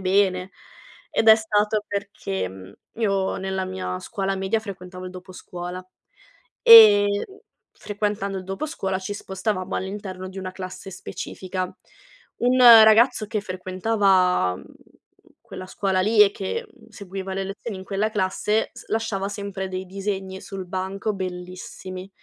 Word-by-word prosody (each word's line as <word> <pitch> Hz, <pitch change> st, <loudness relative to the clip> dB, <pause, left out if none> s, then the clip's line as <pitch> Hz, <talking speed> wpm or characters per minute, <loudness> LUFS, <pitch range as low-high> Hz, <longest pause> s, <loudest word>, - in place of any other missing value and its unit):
bene", 190 Hz, 0 st, +1 dB, 0.6 s
ed -, -, 0 dB
è 220 Hz, -, +10 dB
stato 215 Hz, -1 st, 0 dB
perché, 200 Hz, -, -3 dB
mhmm, 95 Hz, +1 st, -12 dB, 0.3 s
io 195 Hz, -3 st, 0 dB
nella 190 Hz, 0 st, -2 dB
mia 90 Hz, -, -4 dB
scuola 195 Hz, -, -3 dB
media 195 Hz, +4 st, 0 dB
frequentavo 185 Hz, -3 st, -8 dB
il -, -, -7 dB
doposcuola 180 Hz, 0 st, -8 dB, 0.8 s
e, 215 Hz, -3 st, +10 dB, 0.2 s
mhmm, 390 Hz, -, -15 dB, 0.4 s
frequentando 205 Hz, -2 st, -3 dB
il 185 Hz, -, -8 dB
doposcuola 195 Hz, -, -3 dB
ci 190 Hz, +2 st, -5 dB
spostavamo 190 Hz, -1 st, -3 dB
all'interno 190 Hz, -1 st, -5 dB
di 190 Hz, +1 st, -9 dB
una 185 Hz, -1 st, -5 dB
classe 185 Hz, +1 st, -8 dB
specifica. 185 Hz, 0 st, -5 dB, 0.8 s
Un 250 Hz, +1 st, +3 dB
ragazzo 230 Hz, 0 st, +8 dB
che 210 Hz, 0 st, -2 dB
frequentava, 185 Hz, -, +1 dB
mhmm, -, -, -13 dB, 0.9 s
quella 185 Hz, -, -7 dB
scuola 190 Hz, 0 st, -1 dB
lì 210 Hz, +2 st, +5 dB
e 200 Hz, -, +5 dB
che, 335 Hz, -, -4 dB
mhmm, -, -, -21 dB
seguiva 195 Hz, -1 st, -7 dB
le 195 Hz, -, -2 dB
lezioni 200 Hz, +2 st, -6 dB
in -, -, -8 dB
quella 200 Hz, +2 st, -1 dB
classe 210 Hz, +1 st, 0 dB
s -, -, -13 dB
lasciava 210 Hz, -3 st, -1 dB
sempre 200 Hz, -1 st, -5 dB
dei 185 Hz, 0 st, -4 dB
disegni 190 Hz, 0 st, -4 dB
sul 195 Hz, -1 st, -7 dB
banco, 190 Hz, +3 st, -3 dB
bellissimi. 185 Hz, 0 st, -7 dB
195 Hz, 140 wpm, -23 LUFS, 185-210 Hz, 0.9 s, è